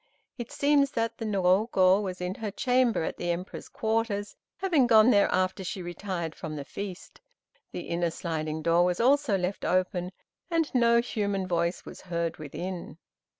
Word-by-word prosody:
It 240 - -6
seems 285 -1 +3
that 230 0 -2
the 225 - -3
Niogo 190 -1 +3
was 185 -3 -5
in 180 +1 -2
her 220 - -2
upper 200 - -6
chamber 250 - +2
at - - -4
the 175 - -3
Emperor's 175 +2 -4
quarters, 220 -2 -1 0.2
having 335 -10 +2
gone 225 +1 +6
there 200 -3 +4
after 185 +1 0
she 185 0 -5
retired 175 -2 -4
from 155 -1 -6
the 145 -2 -6
feast. 195 +1 -8 0.5
The - - -5
inner 170 0 -1
sliding 160 -2 -4
door 170 +2 +4
was 180 0 0
also 265 -3 +3
left 180 +2 -3
open, 180 0 0 0.4
and 330 -3 0
no 235 -2 +4
human 200 -5 -2
voice 170 0 -1
was - - -10
heard 170 -2 -3
from 155 - -8
within. 175 +2 -6
190 Hz, 175 wpm, -28 LUFS, 175-230 Hz, 0.5 s, gone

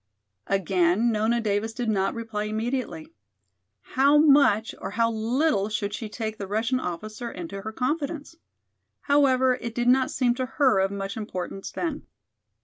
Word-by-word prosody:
Again 195 +3 +2
Nona 220 +2 +1
Davis 215 0 -1
did 245 0 -3
not 195 -1 0
reply 225 -2 -4
immediately. 215 -7 -3 0.7
How 275 - +3
much 280 -8 +4
or - - -4
how 230 +3 +1
little 225 0 +1
should 205 -1 -2
she 215 +1 -5
take 220 0 -5
the 200 - -5
Russian 225 +6 0
officer 215 +5 -5
into 190 +3 -7
her 220 +2 -5
confidence? 295 +5 -3 0.7
However, 260 -3 +3
it 230 -1 -5
did 240 0 0
not 255 +1 +4
seem 245 -2 +1
to 255 - -1
her 260 -9 +4
of 190 0 +2
much 195 0 -5
importance 195 -2 -5
then. 320 -4 -4
225 Hz, 150 wpm, -25 LUFS, 205-255 Hz, 0.7 s, much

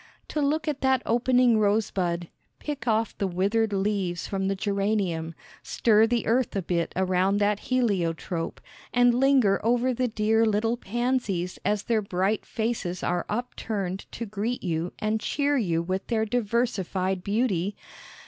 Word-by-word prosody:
To 300 - -1
look 305 +3 0
at 295 -2 -2
that 265 -1 +2
opening 245 -1 +3
rosebud, 190 -5 0 0.3
pick 285 -5 -6
off 225 0 +1
the 195 - +1
withered 200 +5 +1
leaves 195 -3 -1
from 195 -1 -2
the 195 - 0
geranium, 195 -5 -1 0.3
stir 220 -1 +3
the 235 0 0
earth 240 0 +1
a 195 - -1
bit 170 0 -1
around 185 +1 +2
that 205 0 +1
heliotrope, 180 -8 -1 0.3
and 245 0 +4
linger 255 -6 +3
over 245 +3 +2
the 250 +1 0
dear 220 0 +2
little 225 +1 +1
pansies 235 -6 -2
as 205 +1 0
their 225 -2 +1
bright 195 +2 -1
faces 220 -6 -2
are 175 -1 -1
up 240 +4 -3
turned 195 -4 -4
to 235 - -4
greet 215 +4 -3
you 170 -1 -2
and 215 +1 0
cheer 285 +4 0
you 170 -10 +1
with 185 +2 -3
their 220 -2 +1
diversified 200 -5 -1
beauty? 200 -3 0
210 Hz, 150 wpm, -26 LUFS, 190-240 Hz, 0.3 s, and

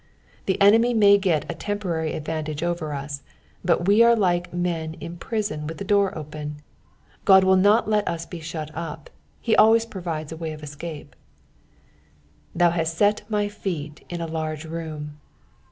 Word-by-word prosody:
The 190 - +1
enemy 225 +4 +5
may 200 -2 +6
get 175 -6 +1
a - - -3
temporary 170 -4 -2
advantage 155 0 -4
over 170 -3 -2
us, 140 0 -5 0.4
but 175 0 +1
we 205 +3 +6
are 235 0 +7
like 175 -4 +1
men 170 -2 -2
in 170 +1 -8
prison 175 -6 -3
with 160 - -6
the - - -5
door 200 -2 +2
open; 150 -1 -6 0.7
Ood 190 0 +8
will 190 0 +5
not 205 +4 +4
let 210 -1 +1
us 165 0 -2
be 175 - -8
shut 155 -1 -6
up, 160 -2 -7 0.3
he 225 - +1
always 225 +1 +6
provides 170 -8 -5
a 160 - -6
way 160 -1 -4
of 155 0 -11
escape. 150 0 -8 0.7
" 75 - -23
T/um 175 -1 +5
hatt 165 -1 -1
tet 205 +1 +3
my 210 -1 +1
^eet 165 -7 -5
in 175 -1 -4
a - - -2
large 160 -1 -4
room." 155 -2 -6
170 Hz, 170 wpm, -24 LUFS, 155-200 Hz, 0.7 s, Ood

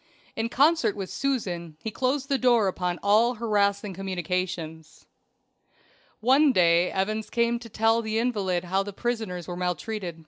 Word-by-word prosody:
In 225 +1 -2
concert 305 -1 +3
with 195 -2 -6
Susan 180 - -3
he 220 - -5
closed 265 +4 -1
the 275 -2 0
door 240 -5 +4
upon 180 -1 -2
all 225 +4 +4
harassing 205 -3 0
communications. 175 -3 -4 1.2
One 270 +5 +5
day 175 -4 +4
Evans 215 +3 -2
came 235 0 +1
to 230 -1 -11
tell 225 +2 +2
the 220 0 -2
invalid 200 -7 0
how 190 +2 0
the 200 0 -6
prisoners 220 -6 -3
were 175 - -5
maltreated. 180 0 -4
205 Hz, 145 wpm, -26 LUFS, 180-235 Hz, 1.2 s, One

